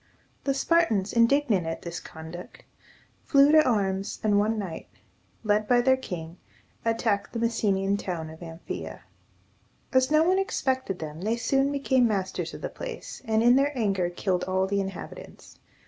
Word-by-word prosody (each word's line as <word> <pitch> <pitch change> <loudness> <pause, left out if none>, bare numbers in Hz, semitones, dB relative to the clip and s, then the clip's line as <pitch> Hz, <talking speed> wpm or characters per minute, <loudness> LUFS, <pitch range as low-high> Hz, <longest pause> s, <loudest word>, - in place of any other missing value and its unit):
The 275 -1 +1
Spartans, 270 - +2
indignant 230 - +3
at 165 - -4
this 170 0 -5
conduct, 160 +2 -10 0.6
flew 280 0 +5
to 310 0 +7
arms, 195 -6 -1
and 205 -2 +3
one 220 +2 +1
night, 190 -6 -5 0.6
led 210 0 +1
by 245 -1 +4
their 260 +1 +4
king, 175 -9 -7 0.5
attacked 225 -3 0
the 230 - -2
Messenian 200 -4 +1
town 165 -5 -5
of 160 - -13
Am 165 0 -9
phe´a. - - -6 0.9
As 260 0 +4
no 310 +1 +4
one 370 +3 +3
expected 260 - -1
them, 155 0 -7
they 220 +4 0
soon 270 +4 +1
became 265 -3 +2
masters 195 -4 -2
of - - -10
the - - -2
place, - - -8
and 220 0 +2
in 245 +2 +6
their 280 0 +1
anger 195 -6 +1
killed 180 0 -1
all 190 0 +1
the 200 +1 0
inhabitants. 195 0 -9
215 Hz, 165 wpm, -26 LUFS, 190-260 Hz, 0.9 s, to